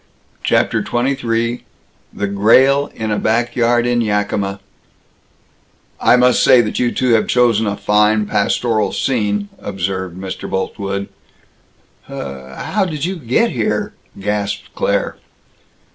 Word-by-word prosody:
CHAPTER -, -, +1 dB
XXIII 120 Hz, -2 st, -1 dB, 0.5 s
THE 105 Hz, -, -3 dB
GRAEL 130 Hz, +8 st, +4 dB
IN 110 Hz, -1 st, -3 dB
A 105 Hz, -, 0 dB
BACK 115 Hz, +2 st, 0 dB
YARD 120 Hz, 0 st, +2 dB
IN 120 Hz, 0 st, +1 dB
YAKIMA 100 Hz, -2 st, -1 dB, 1.4 s
"I -, -, +5 dB
must 125 Hz, 0 st, +4 dB
say 125 Hz, -, +6 dB
that 105 Hz, -3 st, 0 dB
you 120 Hz, -1 st, +1 dB
two 130 Hz, -1 st, 0 dB
have 110 Hz, -, +2 dB
chosen 115 Hz, -3 st, +2 dB
a 100 Hz, 0 st, -2 dB
fine 105 Hz, +1 st, +2 dB
pastoral 110 Hz, +2 st, 0 dB
scene!" 105 Hz, -5 st, -1 dB
observed 95 Hz, -2 st, -4 dB
Mr. 95 Hz, 0 st, -6 dB
Boltwood. 100 Hz, +1 st, -3 dB, 1.0 s
"Hhhhhhhhow 70 Hz, -, -4 dB
did 150 Hz, -2 st, -3 dB
you 185 Hz, +1 st, -3 dB
get 160 Hz, -, +1 dB
here?" 210 Hz, -1 st, -1 dB, 0.3 s
gasped 105 Hz, 0 st, -3 dB
Claire. -, -, -1 dB
110 Hz, 120 wpm, -17 LUFS, 100-125 Hz, 1.4 s, say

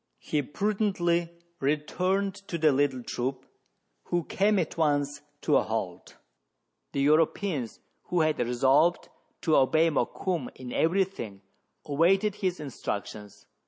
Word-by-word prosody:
He 150 Hz, -, -1 dB
prudently 175 Hz, 0 st, 0 dB, 0.3 s
returned 180 Hz, +7 st, 0 dB
to 170 Hz, -, -3 dB
the 155 Hz, -2 st, +4 dB
little 135 Hz, -2 st, +1 dB
troop, 130 Hz, +2 st, -3 dB, 0.6 s
who 175 Hz, -1 st, 0 dB
came 205 Hz, +5 st, +2 dB
at 170 Hz, -5 st, -1 dB
once 145 Hz, -2 st, 0 dB, 0.2 s
to 150 Hz, -, +3 dB
a -, -, +4 dB
halt. 100 Hz, -5 st, -4 dB, 0.8 s
The 140 Hz, -, -1 dB
Euro 155 Hz, +3 st, +5 dB
peans, 150 Hz, -, -4 dB, 0.3 s
who 175 Hz, -2 st, +1 dB
had 155 Hz, -1 st, +1 dB
resolved 135 Hz, +8 st, +2 dB, 0.3 s
to 160 Hz, -3 st, +2 dB
obey 160 Hz, +5 st, +4 dB
Mokoum 180 Hz, +3 st, -1 dB
in 125 Hz, -1 st, -8 dB
every 180 Hz, +4 st, +3 dB
thing, 110 Hz, -, -8 dB, 0.4 s
awaited 185 Hz, +8 st, +3 dB
his 185 Hz, -3 st, -1 dB
instructions. 105 Hz, -7 st, -6 dB
155 Hz, 125 wpm, -28 LUFS, 135-180 Hz, 0.8 s, Euro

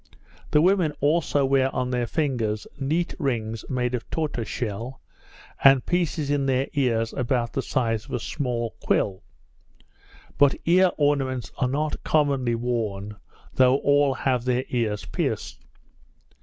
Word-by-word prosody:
The 150 Hz, +1 st, +4 dB
women 180 Hz, -4 st, +3 dB
also 145 Hz, -1 st, +2 dB
wear 135 Hz, 0 st, +3 dB
on 125 Hz, 0 st, -1 dB
their 125 Hz, -1 st, 0 dB
fingers 115 Hz, -9 st, -1 dB
neat 160 Hz, +6 st, -1 dB
rings 115 Hz, -6 st, -2 dB
made 125 Hz, -1 st, -1 dB
of 120 Hz, -2 st, -4 dB
tortoise 150 Hz, -8 st, -2 dB
shell, 120 Hz, +3 st, -4 dB, 0.6 s
and 135 Hz, -2 st, +6 dB
pieces 165 Hz, -4 st, 0 dB
in 140 Hz, -1 st, +1 dB
their 130 Hz, 0 st, +1 dB
ears 115 Hz, -5 st, 0 dB
about 125 Hz, -2 st, -1 dB
the 135 Hz, -, 0 dB
size 115 Hz, -4 st, -1 dB
of 140 Hz, -, -13 dB
a 125 Hz, -, 0 dB
small 120 Hz, -3 st, -3 dB
quill; 95 Hz, -1 st, 0 dB, 1.2 s
but 140 Hz, -1 st, +5 dB
ear 180 Hz, +2 st, +5 dB
ornaments 135 Hz, -6 st, 0 dB
are 130 Hz, -, +2 dB
not 150 Hz, +3 st, -2 dB
commonly 140 Hz, -6 st, +1 dB
worn, 110 Hz, -4 st, -3 dB, 0.4 s
though 130 Hz, 0 st, +5 dB
all 145 Hz, -1 st, +3 dB
have 125 Hz, -3 st, 0 dB
their 125 Hz, 0 st, +1 dB
ears 110 Hz, -4 st, -1 dB
pierced. -, -, -3 dB
130 Hz, 140 wpm, -25 LUFS, 120-145 Hz, 1.2 s, and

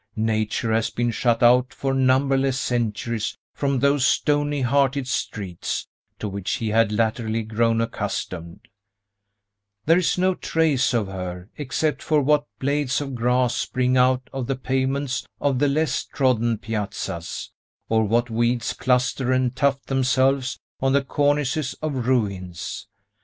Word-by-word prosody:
Nature 110 Hz, 0 st, 0 dB
has 110 Hz, 0 st, +1 dB
been 120 Hz, 0 st, -1 dB
shut 120 Hz, 0 st, +1 dB
out 125 Hz, +1 st, +5 dB
for 135 Hz, -1 st, -2 dB
numberless 135 Hz, 0 st, +2 dB
centuries 115 Hz, -2 st, -2 dB, 0.2 s
from 140 Hz, -1 st, 0 dB
those 140 Hz, +1 st, +2 dB
stony 145 Hz, +1 st, +2 dB
hearted 135 Hz, +1 st, +1 dB
streets, 100 Hz, -8 st, -3 dB, 0.3 s
to 105 Hz, -, -4 dB
which 100 Hz, -1 st, -3 dB
he 110 Hz, -, -2 dB
had 110 Hz, 0 st, +3 dB
latterly 110 Hz, +1 st, 0 dB
grown 115 Hz, +1 st, +1 dB
accustomed; 90 Hz, -5 st, -4 dB, 1.2 s
there 165 Hz, +3 st, +5 dB
is 185 Hz, +1 st, +1 dB
no 185 Hz, +1 st, +3 dB
trace 160 Hz, -6 st, +1 dB
of 110 Hz, -3 st, +1 dB
her, 90 Hz, 0 st, -6 dB
except 150 Hz, +2 st, -1 dB
for 155 Hz, -1 st, +2 dB
what 145 Hz, +1 st, +2 dB
blades 140 Hz, 0 st, 0 dB
of 140 Hz, -2 st, -5 dB
grass 125 Hz, +1 st, +1 dB
spring 130 Hz, 0 st, 0 dB
out 130 Hz, 0 st, +3 dB
of 135 Hz, -3 st, -3 dB
the 135 Hz, -, 0 dB
pavements 135 Hz, +1 st, -1 dB
of 140 Hz, -3 st, +1 dB
the 145 Hz, -, +3 dB
less 155 Hz, +3 st, 0 dB
trodden 120 Hz, -4 st, +1 dB
piazzas, 105 Hz, -6 st, -4 dB, 0.4 s
or 110 Hz, 0 st, +2 dB
what 115 Hz, +3 st, +1 dB
weeds 120 Hz, +1 st, 0 dB
cluster 125 Hz, 0 st, +1 dB
and 130 Hz, -1 st, +1 dB
tuft 140 Hz, 0 st, +1 dB
themselves 130 Hz, 0 st, +1 dB, 0.2 s
on 135 Hz, 0 st, +2 dB
the 140 Hz, 0 st, +3 dB
cornices 145 Hz, 0 st, 0 dB
of 135 Hz, -6 st, -3 dB
ruins. 100 Hz, -9 st, -2 dB
125 Hz, 140 wpm, -23 LUFS, 115-140 Hz, 1.2 s, out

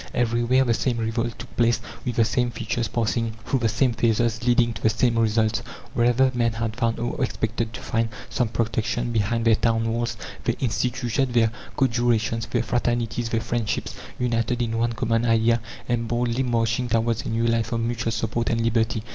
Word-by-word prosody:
Everywhere 120 Hz, +2 st, +2 dB
the 120 Hz, -3 st, +2 dB
same 120 Hz, +1 st, 0 dB
revolt 115 Hz, +1 st, -2 dB
took 120 Hz, +2 st, -11 dB
place, 120 Hz, 0 st, +3 dB, 0.2 s
with 125 Hz, -3 st, -2 dB
the 115 Hz, -, +4 dB
same 120 Hz, +2 st, +1 dB
features, 115 Hz, 0 st, -2 dB
passing 115 Hz, +1 st, -1 dB
through 135 Hz, -, +1 dB
the 115 Hz, -2 st, +1 dB
same 125 Hz, +2 st, +2 dB
phases, 115 Hz, 0 st, +1 dB
leading 120 Hz, -1 st, +3 dB
to 105 Hz, -, -9 dB
the 110 Hz, -, +4 dB
same 115 Hz, +1 st, +2 dB
results. 110 Hz, 0 st, +2 dB, 0.3 s
Wherever 120 Hz, +2 st, +3 dB
men 120 Hz, -2 st, +1 dB
had 110 Hz, -1 st, -3 dB
found, 115 Hz, -1 st, 0 dB
or 120 Hz, +2 st, -2 dB
expected 115 Hz, -2 st, -2 dB
to -, -, -7 dB
find, 115 Hz, 0 st, 0 dB, 0.2 s
some 125 Hz, -3 st, 0 dB
protection 115 Hz, +1 st, -1 dB
behind 115 Hz, +1 st, 0 dB
their 115 Hz, -, +6 dB
town 115 Hz, +1 st, +1 dB
walls, 120 Hz, 0 st, -2 dB, 0.3 s
they -, -, +2 dB
instituted 125 Hz, +1 st, -1 dB
their 115 Hz, -2 st, +4 dB, 0.3 s
"co 135 Hz, -, +4 dB
jurations," 115 Hz, -2 st, +1 dB
their -, -, 0 dB
"fraternities," 120 Hz, 0 st, -1 dB
their 115 Hz, -1 st, 0 dB
"friendships," 115 Hz, -1 st, -2 dB, 0.2 s
united 120 Hz, -1 st, 0 dB
in 115 Hz, -1 st, -2 dB
one 115 Hz, 0 st, +1 dB
common 115 Hz, 0 st, 0 dB
idea, 115 Hz, 0 st, +3 dB, 0.3 s
and 115 Hz, -1 st, 0 dB
boldly 120 Hz, +1 st, 0 dB
marching 120 Hz, -1 st, 0 dB
towards 115 Hz, 0 st, +1 dB
a -, -, -5 dB
new 115 Hz, +1 st, 0 dB
life 115 Hz, 0 st, +1 dB
of 115 Hz, -, 0 dB
mutual 115 Hz, 0 st, -1 dB
support 115 Hz, +1 st, -1 dB
and 115 Hz, -, +1 dB
liberty. 115 Hz, -1 st, +1 dB
115 Hz, 190 wpm, -24 LUFS, 115-120 Hz, 0.3 s, their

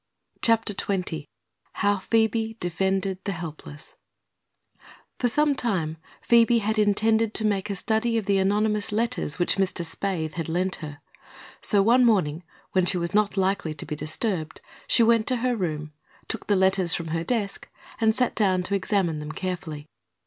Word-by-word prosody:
CHAPTER 225 Hz, -2 st, +2 dB
XX 180 Hz, -7 st, -2 dB, 0.5 s
HOW 205 Hz, 0 st, +1 dB
PHOEBE 225 Hz, +2 st, 0 dB
DEFENDED 190 Hz, +2 st, -1 dB
THE 200 Hz, -, -2 dB
HELPLESS 155 Hz, -3 st, -9 dB, 1.2 s
For 245 Hz, -, +2 dB
some 295 Hz, +5 st, +2 dB
time 185 Hz, -, -2 dB, 0.3 s
Phoebe 235 Hz, 0 st, +5 dB
had 220 Hz, 0 st, 0 dB
intended 220 Hz, +1 st, +2 dB
to 220 Hz, -, +3 dB
make 205 Hz, -1 st, 0 dB
a 200 Hz, -, -2 dB
study 225 Hz, +4 st, 0 dB
of 220 Hz, -, -2 dB
the 195 Hz, -1 st, +2 dB
anonymous 210 Hz, +2 st, +1 dB
letters 215 Hz, -8 st, -1 dB
which 175 Hz, +1 st, +2 dB
Mr. 185 Hz, -3 st, 0 dB
Spaythe 165 Hz, -3 st, -3 dB
had 165 Hz, -2 st, -4 dB
lent 185 Hz, +3 st, -1 dB
her, 150 Hz, -2 st, -9 dB, 0.6 s
so 200 Hz, -2 st, +3 dB
one 240 Hz, +4 st, +5 dB
morning 180 Hz, -9 st, +2 dB, 0.3 s
when 185 Hz, -1 st, +2 dB
she 185 Hz, -, +4 dB
was 170 Hz, -1 st, -3 dB
not 210 Hz, -1 st, +2 dB
likely 190 Hz, -5 st, 0 dB
to 145 Hz, -, -5 dB
be 150 Hz, -, -4 dB
disturbed 155 Hz, +2 st, -3 dB, 0.3 s
she 235 Hz, -, +5 dB
went 230 Hz, -1 st, +3 dB
to 255 Hz, -, +4 dB
her 250 Hz, -1 st, +1 dB
room, 155 Hz, -6 st, -3 dB, 0.3 s
took -, -, -3 dB
the 205 Hz, -, +3 dB
letters 190 Hz, -2 st, +3 dB
from 165 Hz, -1 st, -4 dB
her 165 Hz, +1 st, -1 dB
desk 210 Hz, -2 st, -3 dB, 0.3 s
and 220 Hz, -1 st, +3 dB
sat 250 Hz, -1 st, +1 dB
down 190 Hz, -4 st, +1 dB
to 185 Hz, -, -2 dB
examine 185 Hz, -5 st, 0 dB
them 150 Hz, 0 st, -6 dB
carefully. 170 Hz, -5 st, -5 dB
195 Hz, 165 wpm, -25 LUFS, 170-220 Hz, 1.2 s, Phoebe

